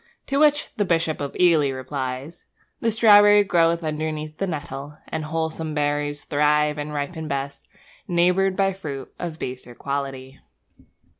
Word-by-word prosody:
To 275 0 0
which 295 -1 +3
the 205 - +2
Bishop 165 -4 0
of 140 - -4
Ely 165 -6 +4
replies: 130 +2 -5 0.3
The 230 - +1
strawberry 205 -2 +7
grows 170 -3 +2
underneath 155 0 -4
the 195 - 0
nettle, 145 -2 -6
And 160 -1 -3
wholesome 160 0 -3
berries 145 0 -1
thrive 150 0 +2
and 145 +1 -4
ripen 150 +2 -4
best, 140 0 -4 0.4
Neighboured 180 +2 +2
by 195 0 +2
fruit 140 -8 -7
of 170 -3 -5
baser 125 -3 -6
quality. 135 -1 -5
155 Hz, 140 wpm, -23 LUFS, 140-175 Hz, 0.4 s, strawberry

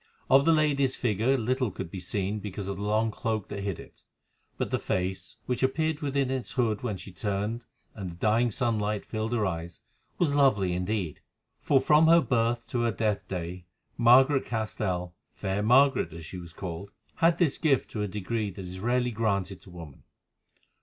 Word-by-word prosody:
Of 135 +1 +6
the 165 - +5
lady's 145 -4 +2
figure 120 +3 +1
little 125 +1 0
could 85 -3 -7
be 95 - -5
seen 100 +3 -2
because 100 -1 -6
of 100 -1 -3
the - - -6
long 110 +2 +1
cloak 110 -1 -3
that 100 - -5
hid 100 -3 -3
it, - - -14 0.6
but - - -2
the - - +1
face, 95 0 -2
which 125 -2 -2
appeared 155 +3 +1
within 140 -3 0
its 130 -2 -3
hood 115 -5 0
when 110 -6 -2
she 95 +2 -10
turned 105 +5 -3 0.3
and 95 -4 -6
the 85 - -9
dying 110 +6 +2
sunlight 105 -3 -1
filled 110 0 -3
her 115 -3 +1
eyes, 85 -2 -4 0.4
was 160 -5 +2
lovely 110 -11 +3
indeed, 90 -2 -2 0.4
for 140 - +3
from 150 +4 +5
her 165 +1 +7
birth 120 -5 0
to 120 - -1
her 120 -1 +2
death 105 -2 -1
day 90 -1 -5 0.3
Margaret 130 +4 +5
Castell—fair 95 -3 -3
Margaret, 125 -4 +4
as 85 -1 -9
she 90 - -8
was 85 -1 -11
called—had 100 - -2
this 165 -6 +1
gift 145 -5 +2
to 105 - -3
a 105 - 0
degree 105 +2 -2
that 95 0 -8
is 90 +1 -7
rarely 125 +3 +1
granted 100 -4 -1
to - - -13
woman. 85 -6 -11
110 Hz, 180 wpm, -28 LUFS, 95-125 Hz, 0.6 s, her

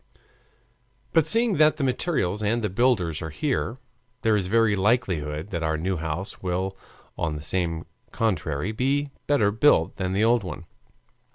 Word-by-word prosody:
But 165 -3 +4
seeing 230 -4 +3
that 155 0 +4
the 145 - -2
materials 125 - 0
and 110 +2 0
the 105 - -1
builders 95 -8 +1
are 80 - -4
here, 130 - -2 0.5
there 110 -1 +3
is 95 -3 0
every 115 0 +3
likelihood 95 -6 0
that 85 - -2
the 80 -1 0
new 90 +4 -1
house 80 +5 -4
will 95 +1 -2 0.4
on 80 -2 -1
the 85 +1 -2 0.3
contrary 90 -5 -1
be 140 +5 0 0.2
better 115 -9 +3
built 110 - +3
than 95 -1 -2
the 100 +3 +2
old 115 -1 +3
one. 90 -1 -7
100 Hz, 155 wpm, -25 LUFS, 85-120 Hz, 0.5 s, But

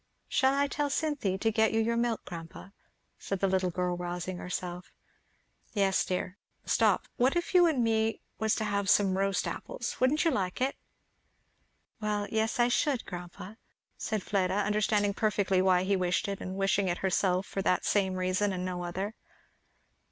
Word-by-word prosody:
"Shall 265 0 +2
I 280 0 +3
tell 290 +1 -1
Cynthy 280 -11 -1
to 225 +3 +1
get 220 0 +2
you 225 - +2
your 230 +1 +1
milk, 235 -1 -1
grandpa?" 165 +1 -9 0.5
said 195 - -3
the 195 - +2
little 185 -1 +1
girl 180 0 -1
rousing 175 +1 -4
herself. 180 0 -5 0.8
"Yes 195 -3 +2
dear. 185 +2 -3 0.3
Stop, - - +2
what 255 +5 +3
if 345 +1 -1
you 355 -1 +7
and 275 -7 +1
me 225 -1 +1 0.2
was 220 -1 +2
to - - -2
have 200 -1 -1
some 195 -3 +4
roast 195 -1 0
apples? - - -5
wouldn't 280 +6 +2
you 330 - +4
like 185 -8 -2
it?" 265 +2 0 1.2
"Well 210 -1 -1
yes, 220 +2 0
I 240 - +5
should, 260 +1 +1
grandpa," 180 +2 -8 0.4
said 215 -4 -3
Fleda, 190 -2 0
understanding 205 0 +1
perfectly 200 -3 +1
why 185 -1 +3
he 195 +1 +1
wished 180 0 0
it, 200 -1 -4
and 185 +1 -5
wishing 195 0 +1
it 175 -1 0
herself 185 0 +1
for 195 - -3
that 180 -1 +1
same 190 -2 +1
reason 185 +2 0
and 180 -1 -3
no 180 -1 -3
other. 190 +5 -3
200 Hz, 175 wpm, -30 LUFS, 185-225 Hz, 1.2 s, you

